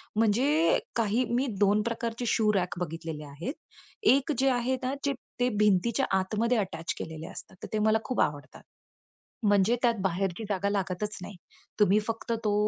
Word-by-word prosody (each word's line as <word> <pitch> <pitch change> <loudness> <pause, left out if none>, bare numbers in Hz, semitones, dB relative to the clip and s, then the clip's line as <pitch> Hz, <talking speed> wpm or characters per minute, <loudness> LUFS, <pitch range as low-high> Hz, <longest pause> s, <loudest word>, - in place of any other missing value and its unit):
म्हणजे 275 - +3 0.2
काही 230 +2 +2
मी 255 +3 +2
2 205 +1 +4
प्रकारचे 230 +1 -3
शू 215 -1 +3
रॅक 180 -3 -1
बघितलेले 165 -2 -5
आहेत. 145 - -5 0.6
एक 275 +2 +1
जे 270 0 +4
आहे 250 +1 +1
ना, 255 +1 0
जे 280 - +2 0.3
ते 245 - +4
भिंतीच्या 210 +2 +3
आतमध्ये 220 +6 0
अटॅच 165 -6 -2
केलेले 160 0 -6
असतात, - - -10
तर - - -4
ते 215 - +1
मला 220 0 +5
खूप 255 - 0
आवडतात. 145 -1 -2 0.8
म्हणजे 205 +2 +4
त्यात 235 -1 +4
बाहेरची 190 +2 -1
जागा 200 0 0
लागतच 200 +1 -2
नाही. 200 - -8 0.5
तुम्ही 205 0 +5
फक्त 225 +1 -2
तो 210 - +2
210 Hz, 160 wpm, -28 LUFS, 185-235 Hz, 0.8 s, मला